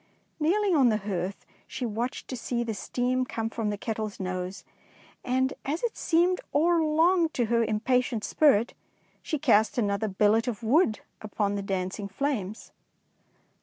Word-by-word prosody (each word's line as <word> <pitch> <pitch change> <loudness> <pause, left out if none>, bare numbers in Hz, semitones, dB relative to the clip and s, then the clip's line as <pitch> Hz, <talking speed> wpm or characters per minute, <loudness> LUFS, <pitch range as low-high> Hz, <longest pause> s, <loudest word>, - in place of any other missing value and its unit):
Kneeling 375 +4 +2
on 265 -5 +5
the 215 - +2
hearth, 195 -2 -4 0.2
she 260 -1 -4
watched 235 +3 -3
to 255 - -3
see 240 0 -2
the 230 -1 -3
steam 250 +5 -1
come 225 -2 -3
from 225 -2 -2
the 205 - -2
kettle's 215 -1 -4
nose, 185 +1 -4 0.6
and 260 +1 +1
as 310 - -3
it 475 - -1
seemed 355 +2 +2
o'er 335 +3 +4
long 325 +2 +3
to 250 -6 -1
her 230 +1 +2
impatient 230 +1 0
spirit, 240 -5 +3 0.5
she 310 - -2
cast 245 -2 +3
another 205 -1 0
billet 210 +4 +2
of 230 -2 -4
wood 235 -1 +3 0.2
upon 205 -1 -1
the 200 - -2
dancing 195 +1 -3
flames. 215 -2 -3
235 Hz, 155 wpm, -27 LUFS, 210-285 Hz, 0.6 s, on